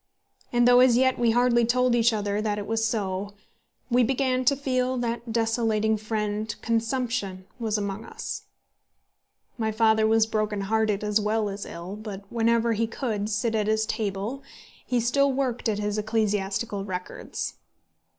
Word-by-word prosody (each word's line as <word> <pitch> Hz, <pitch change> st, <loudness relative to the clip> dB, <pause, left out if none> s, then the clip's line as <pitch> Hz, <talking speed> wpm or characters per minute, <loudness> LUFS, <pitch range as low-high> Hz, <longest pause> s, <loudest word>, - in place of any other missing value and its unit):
And 240 Hz, 0 st, +4 dB
though 245 Hz, 0 st, +7 dB
as 250 Hz, -2 st, +6 dB
yet 260 Hz, 0 st, +3 dB
we 240 Hz, -1 st, +3 dB
hardly 240 Hz, +1 st, +3 dB
told 250 Hz, +1 st, +2 dB
each 235 Hz, 0 st, +4 dB
other 205 Hz, -1 st, -1 dB
that 210 Hz, -1 st, -1 dB
it 205 Hz, -, -4 dB
was 225 Hz, +1 st, -1 dB
so, 205 Hz, -3 st, -2 dB, 0.6 s
we 245 Hz, +1 st, +5 dB
began 255 Hz, +1 st, +1 dB
to 280 Hz, -, +4 dB
feel 255 Hz, -2 st, 0 dB
that 235 Hz, -1 st, -2 dB
that -, -, -4 dB
desolating 225 Hz, -1 st, +1 dB
fiend, 215 Hz, 0 st, -2 dB
consumption, 230 Hz, -4 st, -1 dB
was 220 Hz, -2 st, 0 dB
among 200 Hz, +1 st, -4 dB
us. -, -, -6 dB, 1.1 s
My 220 Hz, -1 st, 0 dB
father 220 Hz, 0 st, +3 dB
was 225 Hz, 0 st, +4 dB
broken 215 Hz, -2 st, -1 dB
hearted 215 Hz, 0 st, 0 dB
as 210 Hz, 0 st, +1 dB
well 210 Hz, 0 st, 0 dB
as 200 Hz, +1 st, -6 dB
ill, 175 Hz, +4 st, -7 dB
but 210 Hz, -2 st, -7 dB
whenever 230 Hz, 0 st, +2 dB
he 225 Hz, +1 st, 0 dB
could 220 Hz, -4 st, -3 dB
sit 220 Hz, +2 st, 0 dB
at 215 Hz, -2 st, 0 dB
his 220 Hz, 0 st, +2 dB
table 215 Hz, +5 st, -3 dB, 0.5 s
he 245 Hz, -, +1 dB
still 275 Hz, +4 st, +2 dB
worked 255 Hz, -3 st, -1 dB
at 210 Hz, -, 0 dB
his 210 Hz, 0 st, -1 dB
ecclesiastical 210 Hz, -1 st, -1 dB
records. 185 Hz, -2 st, -5 dB
220 Hz, 160 wpm, -26 LUFS, 210-240 Hz, 1.1 s, though